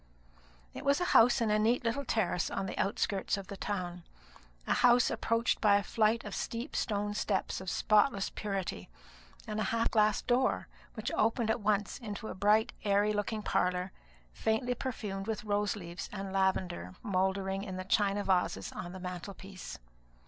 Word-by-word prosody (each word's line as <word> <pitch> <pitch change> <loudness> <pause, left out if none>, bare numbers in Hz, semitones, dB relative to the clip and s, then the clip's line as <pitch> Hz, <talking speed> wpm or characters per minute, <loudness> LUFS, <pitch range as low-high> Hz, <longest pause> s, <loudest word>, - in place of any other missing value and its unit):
It - - -7
was 280 0 +3
a 355 - 0
house 240 +2 +6
in 220 -2 +2
a 210 - +3
neat 235 +4 +2
little 235 +4 0
terrace 205 -8 0
on 195 - -2
the 190 - -4
outskirts 200 0 0
of 195 -1 -8
the 200 - -5
town; 180 -3 -4 0.6
a - - +2
house 245 0 +5
approached 230 0 +1
by 205 -2 +5
a 200 - +2
flight 225 +2 +2
of 210 - -6
steep 235 +5 -4
stone 205 -2 -1
steps 200 -2 -1
of 190 - -4
spotless 210 0 +2
purity, 195 - -4 0.6
and 215 0 -3
a 215 - +1
half 230 0 +1
glass 215 -2 +3
door, 255 +1 +1 0.3
which 220 - -3
opened 225 0 +2
at 230 - -1
once 205 +2 0
into 220 -2 -6
a - - -4
bright 210 +3 +3
airy 205 0 +3
looking 210 +1 -2
parlour, 180 0 0 0.4
faintly 220 +3 0
perfumed 210 -6 -4
with 220 -2 -2
rose 205 0 0
leaves 175 -3 -7
and 195 -1 -5
lavender 185 - 0
mouldering 190 -1 0
in 190 -3 -5
the 185 - -5
china 205 +1 +2
vases 180 - 0
on 175 +1 -6
the 185 - -7
mantelpiece. 185 +1 -7
205 Hz, 170 wpm, -32 LUFS, 190-220 Hz, 0.6 s, house